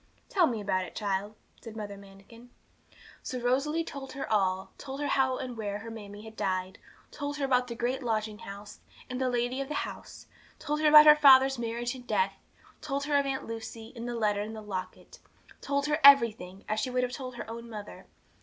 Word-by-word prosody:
'Tell 360 -5 +4
me 235 - -2
all - - -5
about 185 -2 0
it, 180 - -10
child,' 205 0 -2 0.3
said 225 -1 -9
Mother 205 -2 -6
Manikin. 200 +5 -15 0.7
So 255 - -4
Rosalie 275 +7 +1
told 280 -4 -8
her 275 - -5
all 190 -2 +1
told 270 0 -7
her 290 - -2
how 265 -2 +2
and 250 -2 -5
where 205 -2 -3
her 225 +2 -8
mammie 205 -2 -9
had 220 0 -11
died; 185 -2 -2 0.3
told 290 0 -4
her 280 - 0
about 250 -2 +2
the 235 - -6
great 250 +3 -1
lodging 215 -3 -2
house, 200 +1 -10 0.3
and 250 +1 -3
the 260 - +1
lady 245 +2 -1
of 275 - -4
the 300 - -4
house; - - -10 0.3
told 300 +1 -2
her 310 - +4
about 300 0 +10
her 300 0 +10
father's 270 -3 +6
marriage 235 +1 -2
and 250 -2 -11
death; 470 - +1 0.5
told 280 -1 -2
her 290 0 0
of 280 0 +3
her - - -1
Aunt 265 0 -3
Lucy, 225 +1 -8
and 235 0 -5
the 240 - -3
letter 210 -3 +1
and 215 +2 -5
the 215 - -7
locket; 190 - -7 0.4
told 280 0 -1
her 300 +1 0
everything, 225 -9 +5
as 215 0 -1
she 255 - -1
would 250 0 0
have 250 - -1
told 255 -1 -6
her 235 - -7
own 230 +1 -8
mother. 210 -2 -9
240 Hz, 220 wpm, -29 LUFS, 210-270 Hz, 0.7 s, about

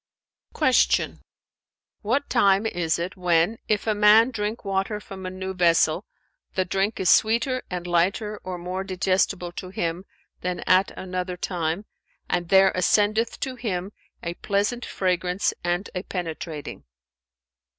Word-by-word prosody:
Q 260 -5 +3 0.8
"What 240 +7 0
time 200 -3 +3
is 170 -7 0
it, 175 +2 -4
when, 180 +3 +2
if 210 -2 0
a 220 - +2
man 210 +4 +6
drink 215 -1 -3
water 195 +2 -1
from 190 -2 -8
a - - -2
new 190 +1 -5
vessel, 170 0 +3 0.5
the 185 - +1
drink 195 +4 -1
is 190 - 0
sweeter 235 +7 +3
and 180 -1 -4
lighter 195 +5 0
or 185 -1 -5
more 180 +2 -4
digestible 185 -1 0
to 180 +1 -7
him 175 0 -3 0.3
than 180 0 -3
at 185 +1 +3
another 180 -1 -4
time, 175 +1 -2 0.4
and 175 -1 -1
there 195 0 +6
ascendeth 215 +5 +2
to 265 - -2
him 200 -6 -3 0.3
a 170 - -3
pleasant 205 +6 -1
fragrance 180 0 0
and 175 +3 -1
a 180 - -2
penetrating?" 165 -5 -6
190 Hz, 140 wpm, -24 LUFS, 180-210 Hz, 0.8 s, man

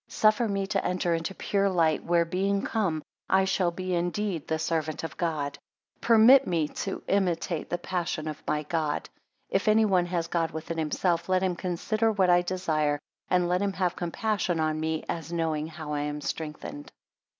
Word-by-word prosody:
Suffer 215 +2 +3
me 195 -1 -1
to 195 -1 -1
enter 180 -1 0
into 165 +3 -2
pure 200 -1 +1
light, 165 -4 +2
where 170 0 +2
being 195 +3 0
come, 180 -9 -1 0.3
I 190 0 +4
shall 190 -2 +1
be 185 +1 -4
indeed 175 0 -1
the 160 - 0
servant 160 -1 -2
of 160 -4 -5
God. 150 -5 -2 0.4
16 - - -40
Permit 235 +4 +7
me 165 -4 +1
to 195 - -4
imitate 175 -4 0
the 175 - 0
passion 175 -3 -3
of 155 -1 -5
my 150 0 0
God. 155 -1 -1 0.4
If 195 +3 +1
any 215 +1 +5
one 185 -4 +2
has 170 -2 -1
God 165 -1 0
within 165 +1 -5
himself, 170 +2 0
let 185 0 +2
him 185 -2 +1
consider 215 +6 0
what 190 -4 +3
I 175 0 +5
desire; 160 -5 0 0.3
and 180 -1 +3
let 180 +2 +1
him 200 -1 0
have 180 -2 0
compassion 180 0 -1
on 155 0 0
me, 160 0 -1
as 165 -1 -4
knowing 160 -2 -1
how 155 -2 -6
I 145 - -1
am 150 0 -3
straightened. 160 - -6
175 Hz, 185 wpm, -27 LUFS, 160-190 Hz, 0.4 s, Permit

